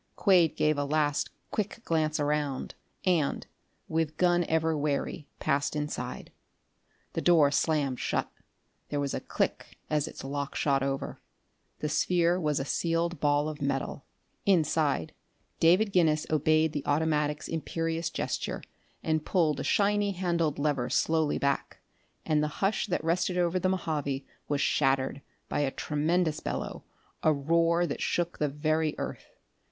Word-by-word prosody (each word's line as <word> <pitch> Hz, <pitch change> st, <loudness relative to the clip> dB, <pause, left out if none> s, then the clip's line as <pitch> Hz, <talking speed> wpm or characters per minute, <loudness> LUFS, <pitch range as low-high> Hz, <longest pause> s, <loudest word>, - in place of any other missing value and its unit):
Quade 180 Hz, -5 st, +4 dB
gave 155 Hz, -1 st, +2 dB
a -, -, +1 dB
last 145 Hz, 0 st, +1 dB, 0.2 s
quick 210 Hz, +2 st, -2 dB
glance 155 Hz, -1 st, +1 dB
around 145 Hz, -2 st, -1 dB, 0.3 s
and, 170 Hz, -6 st, +1 dB, 0.4 s
with 160 Hz, -1 st, -1 dB
gun 175 Hz, 0 st, +3 dB
ever 160 Hz, 0 st, +1 dB
wary, 145 Hz, +1 st, -2 dB
passed 145 Hz, 0 st, 0 dB
inside. 150 Hz, 0 st, -4 dB, 0.8 s
The -, -, -1 dB
door 160 Hz, -5 st, +5 dB
slammed 145 Hz, -4 st, +1 dB
shut: -, -, -1 dB, 0.6 s
there 145 Hz, -, -1 dB
was 140 Hz, -1 st, -1 dB
a -, -, -1 dB
click -, -, -2 dB
as 150 Hz, 0 st, +1 dB
its -, -, -9 dB
lock 140 Hz, +1 st, -4 dB
shot 140 Hz, -2 st, +2 dB
over. 135 Hz, 0 st, -3 dB, 0.6 s
The 150 Hz, -, 0 dB
sphere 175 Hz, +3 st, +2 dB
was 150 Hz, -3 st, +1 dB
a 135 Hz, -, -2 dB
sealed 170 Hz, +2 st, 0 dB
ball 145 Hz, 0 st, +2 dB
of 155 Hz, -2 st, -6 dB
metal. 140 Hz, 0 st, -2 dB, 0.4 s
Inside, 155 Hz, -, +2 dB, 0.5 s
David 185 Hz, +6 st, +4 dB
Guinness 155 Hz, -4 st, +3 dB
obeyed 155 Hz, +1 st, +3 dB
the 145 Hz, -, -2 dB
automatic's 150 Hz, 0 st, +1 dB
imperious 165 Hz, 0 st, -2 dB
gesture -, -, -3 dB, 0.4 s
and 155 Hz, -1 st, 0 dB
pulled 155 Hz, -6 st, +1 dB
a -, -, -2 dB
shiny 205 Hz, 0 st, +2 dB
handled 170 Hz, -4 st, 0 dB
lever 140 Hz, -4 st, 0 dB
slowly 160 Hz, -2 st, +2 dB
back, 140 Hz, 0 st, -1 dB, 0.5 s
and 150 Hz, -1 st, +2 dB
the 150 Hz, -, +1 dB
hush 200 Hz, +3 st, +1 dB
that 180 Hz, -5 st, -1 dB
rested 180 Hz, +2 st, +1 dB
over 175 Hz, +1 st, +2 dB
the 185 Hz, -, +1 dB
Mojave 150 Hz, -7 st, -2 dB, 0.2 s
was 145 Hz, -1 st, 0 dB
shattered 135 Hz, 0 st, +1 dB, 0.3 s
by -, -, -1 dB
a 145 Hz, -2 st, +2 dB
tremendous 155 Hz, +3 st, 0 dB
bellow, -, -, -4 dB, 0.4 s
a 155 Hz, -, +4 dB
roar 165 Hz, +4 st, +2 dB
that 140 Hz, -, -4 dB
shook 175 Hz, 0 st, -1 dB
the 150 Hz, -, +1 dB
very 155 Hz, +2 st, 0 dB
earth. -, -, -6 dB
155 Hz, 145 wpm, -29 LUFS, 145-170 Hz, 0.8 s, door